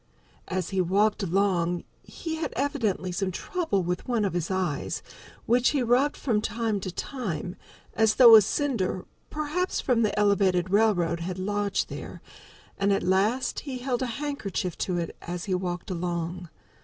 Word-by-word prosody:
As 185 Hz, 0 st, -2 dB
he 190 Hz, -1 st, +1 dB
walked 205 Hz, +4 st, +2 dB
along 180 Hz, -2 st, +1 dB, 0.2 s
he 320 Hz, -2 st, -6 dB
had 320 Hz, -, -3 dB
evidently 235 Hz, -10 st, -1 dB
some 190 Hz, +2 st, -1 dB
trouble 200 Hz, -, -1 dB
with 180 Hz, +1 st, -3 dB
one 235 Hz, -4 st, +1 dB
of 195 Hz, -, -1 dB
his 175 Hz, -2 st, -2 dB
eyes, 185 Hz, -6 st, -2 dB, 0.4 s
which 245 Hz, +2 st, +4 dB
he 280 Hz, -4 st, +1 dB
rubbed 250 Hz, +5 st, +2 dB
from 220 Hz, -6 st, 0 dB
time 220 Hz, -1 st, -1 dB
to 185 Hz, -1 st, -5 dB
time, 185 Hz, -, -4 dB, 0.4 s
as 220 Hz, -1 st, +3 dB
though 235 Hz, -3 st, +10 dB
a 220 Hz, -, +10 dB
cinder, 200 Hz, -6 st, -1 dB, 0.2 s
perhaps, 305 Hz, +5 st, -1 dB
from 245 Hz, -3 st, +2 dB
the 210 Hz, -2 st, +1 dB
Elevated 195 Hz, -3 st, +2 dB
Railroad 195 Hz, -6 st, +3 dB
had 180 Hz, +2 st, -4 dB
lodged 205 Hz, +1 st, -1 dB
there, -, -, -8 dB, 0.6 s
and 200 Hz, 0 st, +2 dB
at 195 Hz, -, +1 dB
last 205 Hz, +8 st, +1 dB
he 270 Hz, -3 st, -5 dB
held 250 Hz, 0 st, -2 dB
a 255 Hz, -, 0 dB
handkerchief 235 Hz, -, -3 dB
to 180 Hz, -2 st, -1 dB
it 170 Hz, -1 st, -3 dB
as 175 Hz, 0 st, -5 dB
he 195 Hz, -, -1 dB
walked 180 Hz, 0 st, -3 dB
along. 175 Hz, 0 st, -3 dB
200 Hz, 165 wpm, -27 LUFS, 180-240 Hz, 0.6 s, though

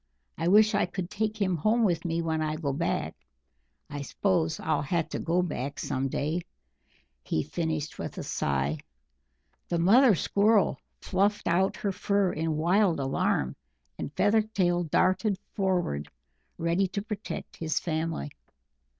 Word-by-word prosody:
I 165 Hz, -, -2 dB
wish 215 Hz, +4 st, +6 dB
I 200 Hz, -, +2 dB
could 180 Hz, +1 st, -5 dB
take 215 Hz, +1 st, -2 dB
him 185 Hz, -3 st, +1 dB
home 220 Hz, +9 st, +2 dB
with 175 Hz, -6 st, +1 dB
me 170 Hz, 0 st, -1 dB
when 160 Hz, -1 st, -1 dB
I 155 Hz, 0 st, -1 dB
go 150 Hz, -3 st, -2 dB
back -, -, -1 dB, 0.7 s
I 145 Hz, -1 st, -6 dB
s'pose 165 Hz, +1 st, 0 dB
I'll 160 Hz, -, 0 dB
have 165 Hz, +3 st, -1 dB
to -, -, -3 dB
go 175 Hz, +2 st, +1 dB
back 140 Hz, -5 st, -4 dB
some 130 Hz, +1 st, -1 dB
day," 155 Hz, +6 st, -1 dB, 0.8 s
he 80 Hz, -, -1 dB
finished 160 Hz, -, -3 dB
with -, -, -5 dB
a -, -, -4 dB
sigh. 70 Hz, +2 st, -1 dB, 0.9 s
The 170 Hz, -, +1 dB
mother 215 Hz, +7 st, +6 dB
Squirrel 205 Hz, +4 st, +2 dB, 0.2 s
fluffed 200 Hz, +2 st, 0 dB
out 185 Hz, +3 st, +2 dB
her 200 Hz, -, -1 dB
fur 200 Hz, -1 st, +1 dB
in 160 Hz, 0 st, -1 dB
wild 175 Hz, +1 st, +3 dB
alarm, 135 Hz, -, 0 dB, 0.4 s
and -, -, -4 dB
Feathertail 200 Hz, -5 st, +2 dB
darted 185 Hz, +4 st, +2 dB, 0.2 s
forward 180 Hz, -, 0 dB, 0.5 s
ready 170 Hz, +4 st, +1 dB
to 200 Hz, +2 st, -4 dB
protect 210 Hz, -1 st, -6 dB
his 160 Hz, -2 st, -1 dB
family. 160 Hz, -2 st, -2 dB
175 Hz, 145 wpm, -28 LUFS, 155-200 Hz, 0.9 s, wish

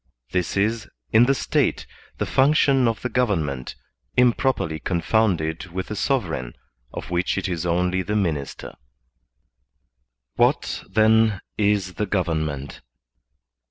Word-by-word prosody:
This 90 Hz, +1 st, -1 dB
is, 110 Hz, +3 st, 0 dB, 0.2 s
in 115 Hz, +2 st, +6 dB
the 135 Hz, -, +3 dB
State, -, -, 0 dB, 0.3 s
the -, -, -1 dB
function 135 Hz, -2 st, +3 dB
of 115 Hz, -, -2 dB
the -, -, 0 dB
government, 80 Hz, -, -1 dB, 0.4 s
improperly 125 Hz, -, +2 dB
confounded 85 Hz, -2 st, 0 dB
with 90 Hz, +2 st, -5 dB
the 105 Hz, -, -3 dB
sov 135 Hz, +3 st, +1 dB
ereign 60 Hz, -8 st, -5 dB, 0.4 s
of -, -, -7 dB
which 90 Hz, +2 st, 0 dB
it 95 Hz, -, -1 dB
is 90 Hz, -1 st, -2 dB
only 90 Hz, +2 st, +1 dB
the 105 Hz, +4 st, -3 dB
minister.* 80 Hz, -9 st, -2 dB, 1.6 s
What, -, -, +1 dB
then, 110 Hz, -1 st, +4 dB, 0.2 s
is 100 Hz, -3 st, +1 dB
the 105 Hz, -, 0 dB
government 80 Hz, -7 st, -2 dB
95 Hz, 125 wpm, -23 LUFS, 85-110 Hz, 1.6 s, in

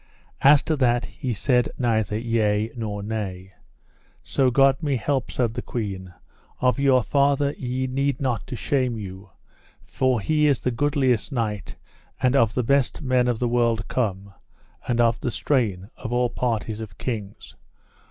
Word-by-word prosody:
As 140 Hz, +1 st, +6 dB
to 160 Hz, -, 0 dB
that, 120 Hz, -2 st, +2 dB
he 130 Hz, -, -5 dB
said 125 Hz, +3 st, +1 dB
neither 110 Hz, -4 st, 0 dB
yea 110 Hz, -1 st, 0 dB
nor 105 Hz, -3 st, -4 dB
nay. 95 Hz, -3 st, -5 dB, 0.7 s
So 130 Hz, -2 st, +2 dB
God 135 Hz, +3 st, +4 dB
me 145 Hz, -4 st, 0 dB
help, 130 Hz, +1 st, -1 dB
said 120 Hz, -3 st, -1 dB
the 120 Hz, -, -4 dB
queen, 95 Hz, -7 st, -5 dB, 0.5 s
of 125 Hz, +2 st, +2 dB
your 135 Hz, -3 st, +4 dB
father 140 Hz, +1 st, +2 dB
ye 130 Hz, +1 st, -3 dB
need 135 Hz, 0 st, -1 dB
not 125 Hz, -6 st, -2 dB
to -, -, -5 dB
shame 125 Hz, -2 st, 0 dB
you, 95 Hz, -1 st, -8 dB, 0.5 s
for 130 Hz, -3 st, 0 dB
he 150 Hz, +8 st, +2 dB
is 140 Hz, -5 st, +2 dB
the 125 Hz, -, 0 dB
goodliest 130 Hz, -1 st, +1 dB
knight, 110 Hz, -6 st, -3 dB, 0.4 s
and 130 Hz, 0 st, +2 dB
of 115 Hz, -4 st, +3 dB
the 125 Hz, -, +1 dB
best 140 Hz, +4 st, +1 dB
men 130 Hz, -2 st, +2 dB
of 120 Hz, -2 st, +1 dB
the 120 Hz, -, 0 dB
world 115 Hz, -2 st, +1 dB
come, 100 Hz, -5 st, -2 dB, 0.5 s
and 120 Hz, -1 st, 0 dB
of 115 Hz, -1 st, +3 dB
the -, -, -2 dB
strain, 110 Hz, -6 st, -1 dB
of 120 Hz, -, -6 dB
all 120 Hz, 0 st, +1 dB
parties, 115 Hz, -3 st, -2 dB
of 105 Hz, -5 st, -9 dB
kings. 105 Hz, -, -6 dB
120 Hz, 160 wpm, -24 LUFS, 110-130 Hz, 0.7 s, As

